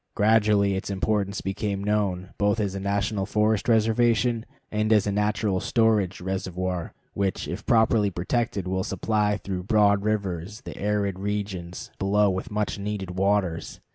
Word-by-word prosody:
Gradually 105 Hz, -2 st, +3 dB
its 95 Hz, +1 st, -3 dB
importance 100 Hz, 0 st, -1 dB
became 100 Hz, 0 st, -2 dB
known, 100 Hz, -3 st, 0 dB
both 105 Hz, +2 st, +2 dB
as 100 Hz, -3 st, -1 dB
a 95 Hz, -, -4 dB
national 100 Hz, +1 st, -1 dB
forest 105 Hz, +1 st, +1 dB
reservation 115 Hz, +1 st, +2 dB, 0.2 s
and 110 Hz, +1 st, 0 dB
as 105 Hz, -2 st, +5 dB
a 100 Hz, -, 0 dB
natural 105 Hz, -1 st, 0 dB
storage 110 Hz, -5 st, +2 dB
reservoir, 95 Hz, -2 st, -3 dB, 0.2 s
which, 100 Hz, -1 st, -1 dB
if -, -, -6 dB
properly 110 Hz, -2 st, +4 dB
protected, 100 Hz, +2 st, -2 dB
will 95 Hz, 0 st, -1 dB
supply 105 Hz, -1 st, 0 dB
through 95 Hz, -2 st, -4 dB
broad 100 Hz, 0 st, +3 dB
rivers 100 Hz, -1 st, -2 dB
the -, -, -8 dB
arid 100 Hz, -2 st, -1 dB
regions 100 Hz, -3 st, -4 dB
below 100 Hz, +1 st, +3 dB
with 95 Hz, +6 st, -4 dB
much 105 Hz, -1 st, -2 dB
needed 100 Hz, -2 st, -4 dB
waters. 95 Hz, -2 st, 0 dB
100 Hz, 145 wpm, -25 LUFS, 95-105 Hz, 0.2 s, as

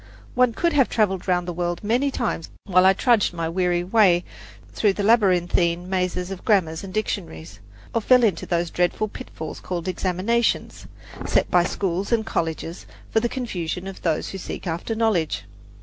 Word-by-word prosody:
One 250 Hz, -1 st, +3 dB
could 340 Hz, +7 st, 0 dB
have 275 Hz, -4 st, +3 dB
traveled 195 Hz, -5 st, 0 dB
round 180 Hz, -1 st, +1 dB
the 175 Hz, -, -3 dB
word 175 Hz, +1 st, -3 dB
many 245 Hz, +7 st, +1 dB
times 165 Hz, -10 st, -3 dB
while 185 Hz, -1 st, +4 dB
I 190 Hz, -, +6 dB
trudged 225 Hz, -1 st, +2 dB
my 165 Hz, -1 st, -2 dB
weary 175 Hz, 0 st, 0 dB
way 180 Hz, -3 st, +4 dB, 0.5 s
through 205 Hz, -3 st, +2 dB
the 205 Hz, -, -3 dB
labyrinthine 180 Hz, -5 st, +2 dB
mazes 180 Hz, 0 st, -1 dB
of 190 Hz, -, -7 dB
grammars 170 Hz, -6 st, +1 dB
and 195 Hz, -, -7 dB
dictionaries, 105 Hz, -, -4 dB, 0.3 s
or 230 Hz, -, +1 dB
fell 250 Hz, +2 st, +5 dB
into 205 Hz, -7 st, +1 dB
those 170 Hz, -1 st, 0 dB
dreadful 180 Hz, +4 st, 0 dB
pitfalls 180 Hz, -9 st, -8 dB
called 175 Hz, -1 st, -5 dB
examinations, 185 Hz, +6 st, -1 dB, 0.4 s
set -, -, +1 dB
by 175 Hz, -1 st, +5 dB
schools 190 Hz, +2 st, -2 dB
and 225 Hz, -2 st, +2 dB
colleges 165 Hz, -2 st, -3 dB, 0.2 s
for 220 Hz, -, +3 dB
the 240 Hz, +1 st, -1 dB
confusion 185 Hz, -9 st, -4 dB
of 195 Hz, -1 st, -8 dB
those 160 Hz, -3 st, -1 dB
who 195 Hz, -, -6 dB
seek 180 Hz, -, -7 dB
after 170 Hz, +6 st, -3 dB
knowledge. 215 Hz, -8 st, 0 dB
185 Hz, 170 wpm, -23 LUFS, 175-220 Hz, 0.5 s, I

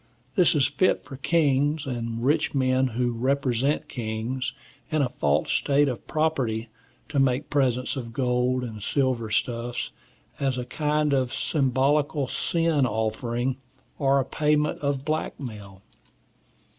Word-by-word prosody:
This 180 Hz, -5 st, +4 dB
is 140 Hz, -3 st, +4 dB
fit 145 Hz, +7 st, +2 dB
for 135 Hz, -, -8 dB
kings, 145 Hz, 0 st, +2 dB
and 115 Hz, -2 st, -3 dB
rich 150 Hz, +2 st, +2 dB
men 130 Hz, 0 st, +2 dB
who 125 Hz, -1 st, +1 dB
represent 130 Hz, +2 st, 0 dB
kings, 120 Hz, +3 st, -3 dB, 0.4 s
and 155 Hz, -2 st, +2 dB
a 125 Hz, -, 0 dB
false 75 Hz, -, 0 dB
state 145 Hz, 0 st, +3 dB
of 120 Hz, -6 st, -4 dB
property, 130 Hz, -8 st, 0 dB, 0.4 s
to 145 Hz, -, 0 dB
make 135 Hz, +1 st, +1 dB
presents 130 Hz, -3 st, +1 dB
of 120 Hz, -4 st, -5 dB
gold 125 Hz, +1 st, +1 dB
and 110 Hz, -3 st, -6 dB
silver 130 Hz, -1 st, 0 dB
stuffs, 120 Hz, +2 st, -1 dB, 0.5 s
as 135 Hz, -2 st, 0 dB
a 125 Hz, -, -3 dB
kind 150 Hz, +2 st, 0 dB
of 130 Hz, -3 st, +1 dB
symbolical 140 Hz, +1 st, +1 dB
sin 165 Hz, -2 st, +1 dB
offering, 115 Hz, +3 st, -1 dB, 0.4 s
or 135 Hz, -1 st, +3 dB
payment 150 Hz, +1 st, +1 dB
of 140 Hz, -1 st, -1 dB
blackmail. 110 Hz, -11 st, -4 dB
130 Hz, 130 wpm, -26 LUFS, 120-145 Hz, 0.5 s, This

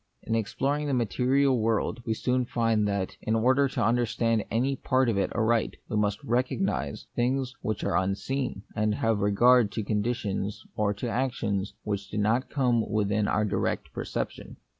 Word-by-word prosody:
In 115 Hz, -, -3 dB
exploring 135 Hz, +7 st, 0 dB
the 140 Hz, -, +1 dB
material 125 Hz, +4 st, +2 dB
world, 110 Hz, +1 st, 0 dB
we 110 Hz, -, +1 dB
soon 125 Hz, +2 st, +1 dB
find 115 Hz, -3 st, +1 dB
that, 100 Hz, -2 st, -2 dB
in 110 Hz, -, 0 dB
order 130 Hz, +5 st, +3 dB
to 130 Hz, -, -1 dB
understand 115 Hz, -1 st, +1 dB
any 130 Hz, +5 st, +1 dB
part 130 Hz, 0 st, +1 dB
of 115 Hz, -, +1 dB
it 100 Hz, -, 0 dB
aright, 115 Hz, 0 st, +1 dB
we -, -, -2 dB
must 105 Hz, -1 st, 0 dB
recognise 125 Hz, -, -1 dB
things 130 Hz, +1 st, 0 dB
which 110 Hz, -, -2 dB
are -, -, 0 dB
unseen, 100 Hz, +4 st, -1 dB
and 105 Hz, 0 st, +1 dB
have 115 Hz, -1 st, +1 dB
regard 105 Hz, +3 st, +4 dB
to 110 Hz, -, -2 dB
conditions 105 Hz, -2 st, -2 dB
or 105 Hz, -1 st, +1 dB
to 115 Hz, +5 st, -4 dB
actions 110 Hz, -5 st, -1 dB
which 100 Hz, -2 st, -3 dB
do 105 Hz, -, -5 dB
not 110 Hz, +5 st, +1 dB
come 125 Hz, -5 st, +2 dB
within 105 Hz, 0 st, +1 dB
our 110 Hz, -, +1 dB
direct 95 Hz, -2 st, -2 dB
perception. -, -, -5 dB
115 Hz, 165 wpm, -27 LUFS, 105-125 Hz, -, regard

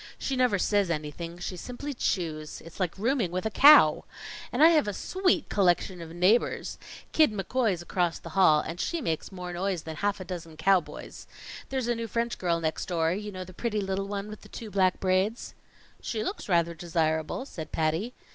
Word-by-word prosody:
She 270 Hz, -, -2 dB
never 250 Hz, -5 st, +3 dB
says 200 Hz, 0 st, +1 dB
anything; 165 Hz, +2 st, -4 dB
she 175 Hz, +1 st, -5 dB
simply 250 Hz, +9 st, -6 dB
chews. 160 Hz, -, -2 dB
It's 165 Hz, +3 st, -13 dB
like 180 Hz, -2 st, -1 dB
rooming 230 Hz, -1 st, +1 dB
with 185 Hz, +4 st, -3 dB
a 220 Hz, -, 0 dB
cow. 295 Hz, +7 st, +7 dB, 0.5 s
And -, -, +3 dB
I 325 Hz, -, +10 dB
have 310 Hz, -9 st, +3 dB
a 205 Hz, -, -2 dB
sweet 370 Hz, -4 st, 0 dB
collection 180 Hz, -1 st, +1 dB
of 165 Hz, -, -8 dB
neighbors! 180 Hz, +8 st, +1 dB, 0.3 s
Kid 310 Hz, -6 st, +4 dB
McCoy's 205 Hz, -2 st, -1 dB
across 175 Hz, -1 st, 0 dB
the 170 Hz, -, -10 dB
hall, 160 Hz, -3 st, +5 dB
and 165 Hz, +3 st, -6 dB
she 340 Hz, -, -1 dB
makes 165 Hz, -, -3 dB
more 180 Hz, -2 st, -6 dB
noise 185 Hz, -1 st, -2 dB
than 160 Hz, -1 st, -7 dB
half 205 Hz, +2 st, -1 dB
a 185 Hz, -, -7 dB
dozen 165 Hz, -3 st, -7 dB
cowboys. 185 Hz, +1 st, 0 dB, 0.4 s
There's 260 Hz, -3 st, -2 dB
a 240 Hz, -, +2 dB
new 230 Hz, 0 st, -4 dB
French 235 Hz, +2 st, -2 dB
girl 170 Hz, -2 st, +1 dB
next 160 Hz, -1 st, -2 dB
door 165 Hz, -2 st, +1 dB
you 210 Hz, +2 st, -5 dB
know, 185 Hz, -1 st, -6 dB
the 185 Hz, 0 st, -12 dB
pretty 215 Hz, +2 st, -2 dB
little 195 Hz, 0 st, -2 dB
one 200 Hz, 0 st, -4 dB
with 215 Hz, 0 st, -9 dB
the -, -, -15 dB
two 220 Hz, -3 st, -8 dB
black 185 Hz, -1 st, +2 dB
braids." 190 Hz, +5 st, 0 dB, 0.5 s
"She 220 Hz, -2 st, -3 dB
looks 385 Hz, -, -5 dB
rather 170 Hz, -2 st, +2 dB
desirable," 160 Hz, -, -1 dB
said 160 Hz, -, -8 dB
Patty. 165 Hz, +10 st, -1 dB
190 Hz, 195 wpm, -28 LUFS, 170-220 Hz, 0.5 s, I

